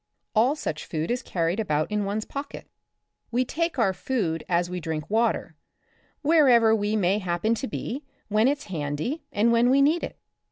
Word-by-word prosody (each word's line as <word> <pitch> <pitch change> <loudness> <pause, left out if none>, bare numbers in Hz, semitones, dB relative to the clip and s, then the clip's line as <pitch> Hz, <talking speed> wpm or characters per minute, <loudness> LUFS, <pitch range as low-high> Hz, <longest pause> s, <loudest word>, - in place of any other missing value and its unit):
All 240 +6 +3
such 155 - -4
food 160 +4 -2
is 245 +1 -1
carried 170 -2 -1
about 155 -5 0
in 210 -1 0
one's 210 +2 -2
pocket. 280 0 -7 0.6
We 250 +2 +1
take 335 +3 -2
our 210 -6 +2
food 185 -6 -2
as 175 0 +2
we 180 0 -4
drink 160 -2 -4
water, 230 +2 +1 0.7
wherever 255 -8 +5
we 210 0 0
may 200 0 +2
happen 185 +3 0
to 230 +4 -3
be, 270 +4 -5 0.2
when 215 +3 +3
it's 285 +1 0
handy 160 - -3
and 225 +3 +2
when 235 +1 +4
we 270 +2 +4
need 305 +5 +3
it. - - -5
220 Hz, 175 wpm, -26 LUFS, 175-255 Hz, 0.7 s, wherever